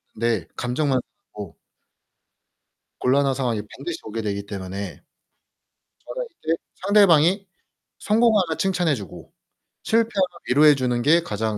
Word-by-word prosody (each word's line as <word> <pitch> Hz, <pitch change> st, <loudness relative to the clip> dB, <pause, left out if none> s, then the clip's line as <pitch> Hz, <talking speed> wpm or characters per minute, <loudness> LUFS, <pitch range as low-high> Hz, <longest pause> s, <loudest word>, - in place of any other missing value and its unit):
네. 110 Hz, -7 st, -1 dB
감정만 130 Hz, +2 st, 0 dB, 0.4 s
상하고 100 Hz, -5 st, -8 dB, 1.4 s
곤란한 135 Hz, +1 st, +2 dB
상황이 120 Hz, -5 st, -1 dB
반드시 160 Hz, +5 st, -6 dB
오게 110 Hz, +1 st, -5 dB
되기 100 Hz, -1 st, -3 dB
때문에 95 Hz, -1 st, -6 dB, 1.0 s
저는 -, -, -5 dB, 0.2 s
이제 165 Hz, +1 st, +1 dB, 0.3 s
상대방이 195 Hz, -1 st, +4 dB, 0.5 s
성공하면 210 Hz, -7 st, +2 dB
칭찬해 180 Hz, -4 st, +1 dB
주고 100 Hz, -7 st, -10 dB, 0.5 s
실패하면 220 Hz, -5 st, +1 dB, 0.2 s
위로해 145 Hz, +3 st, +6 dB
주는 125 Hz, -2 st, -1 dB
게 165 Hz, +6 st, +4 dB
가장 110 Hz, -5 st, -3 dB
140 Hz, 270 characters per minute, -23 LUFS, 110-180 Hz, 1.4 s, 위로해